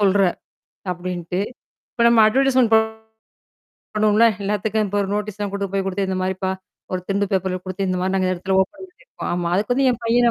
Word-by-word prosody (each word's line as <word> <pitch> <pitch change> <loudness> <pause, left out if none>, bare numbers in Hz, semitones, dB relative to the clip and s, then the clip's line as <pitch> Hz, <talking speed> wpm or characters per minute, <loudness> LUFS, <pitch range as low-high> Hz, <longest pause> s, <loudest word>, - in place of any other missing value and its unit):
சொல்ற! 200 0 +3 0.7
அப்படீன்ட்டு, 180 0 -4 0.5
இப்ப 235 - 0
நம்ம 235 -1 +6
அட்வெர்டைசெமென்ட் 255 -1 +3
பண் 220 0 +4 1.1
பண்ணுவோம்ல, 215 +2 +5 0.2
எல்லாத்துக்கும் 210 +2 0
இப்ப 205 +1 -3
ஒரு 195 - -4
நோட்டீஸ்லாம் 210 -1 -3
கொண்டு 200 -1 -2
போய்க் 195 -1 -1
குடுத்து 195 0 -1
இந்த 190 - -1
மாதிரிப்பா, 190 0 -1 0.4
ஒரு 185 - -1
திண்டு 200 +1 +1
பேப்பர்ல 185 -1 0
குடுத்து 185 +1 -3
இந்த 185 - 0
மாரி 185 +1 0
அந்த 185 0 +1
இடத்துல 190 +2 -2
ஓப்பன் 300 - -8
பண்ணீருக்கோம். 435 +7 -8
ஆமா, 175 -1 -1
அதுக்கு 245 +6 +1
என் 240 - -6
பையனே 235 +1 +4
200 Hz, 175 wpm, -21 LUFS, 185-220 Hz, 1.1 s, நம்ம